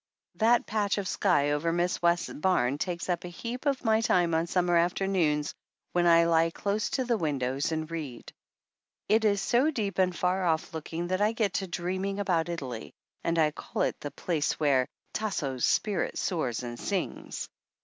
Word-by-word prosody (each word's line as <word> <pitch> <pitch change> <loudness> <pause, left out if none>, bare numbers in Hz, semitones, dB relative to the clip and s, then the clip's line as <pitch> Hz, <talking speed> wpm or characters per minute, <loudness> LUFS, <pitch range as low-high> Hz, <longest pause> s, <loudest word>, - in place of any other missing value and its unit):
That 235 +2 +3
patch 210 -2 0
of 200 -2 -2
sky 145 -9 +2
over 150 +3 0
Mrs. 175 +1 0
West's 170 0 +2
barn 145 -5 +1
takes 175 -1 -3
up 175 -2 -1
a - - -5
heap 235 - -5
of 275 -2 0
my 220 -1 +3
time 175 -6 +2
on 165 +1 +1
summer 175 -1 +2
after 175 +3 +2
noons 155 -6 +1 0.4
when 175 0 +2
I 165 -1 +5
he - - 0
close 205 +4 -1
to 260 - -1
the 235 -3 +1
windows 140 -2 -1
and 155 0 -3
read. 150 -8 -6 0.7
It 220 +2 +3
is 200 -2 +2
so 245 +9 +3
deep 210 -10 -2
and 185 -1 +2
far 185 +1 +1
off 165 -2 0
looking 165 +2 -4
that 185 +1 0
I 210 +2 +3
get 215 -4 0
to 190 - -5
dreaming 185 +3 -2
about 175 -4 +1
Italy, 130 -9 -5 0.3
and 170 0 0
I 155 -2 +4
call - - -3
it - - -1
the 145 - -5
place 155 +1 -1
where 135 -4 +3 0.3
"Tasso's 145 - -1
spirit 205 -3 0
soars 130 -10 -1
and 120 -1 -6
sings." - - -3
175 Hz, 185 wpm, -28 LUFS, 155-200 Hz, 0.7 s, I